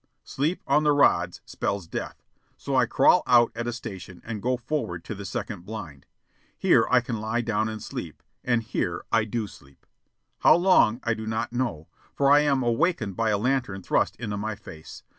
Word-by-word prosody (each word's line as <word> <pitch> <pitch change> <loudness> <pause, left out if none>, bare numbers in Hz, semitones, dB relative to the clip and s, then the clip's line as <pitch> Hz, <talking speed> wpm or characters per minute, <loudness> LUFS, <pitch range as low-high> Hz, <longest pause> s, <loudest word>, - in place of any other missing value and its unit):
Sleep 155 +7 -2
on 145 +2 +3
the 150 -1 +4
rods 90 -11 +2
spells 100 -3 -3
death, - - -6 0.3
so - - -3
I - - +4
crawl - - +4
out 120 -1 +5
at 120 +1 -4
a - - 0
station 95 -6 -8
and 110 -3 -5
go 125 +3 0
forward 120 - -3
to - - -6
the 100 -1 -8
second 100 -2 -5
blind. 90 -9 -8 0.5
Here - - +4
I 125 -1 +5
can 115 -3 -4
lie 110 +2 -1
down 110 -1 -1
and 110 -1 -6
sleep; - - -7 0.2
and 120 -2 +1
here 110 - -3
I 115 -2 +3
do 110 0 -2
sleep 70 -8 -16 0.5
how - - +6
long 170 - +4
I 115 - +1
do 110 0 -6
not 110 +1 -2
know 120 -12 -2 0.3
for 140 0 +3
I 145 - +8
am 140 -3 +2
awakened 120 - 0
by 115 -1 0
a 105 - +2
lantern 115 -4 -1
thrust - - +1
into 105 -4 -4
my 110 +1 -3
face. 80 -5 -12
110 Hz, 195 wpm, -26 LUFS, 100-125 Hz, 0.5 s, I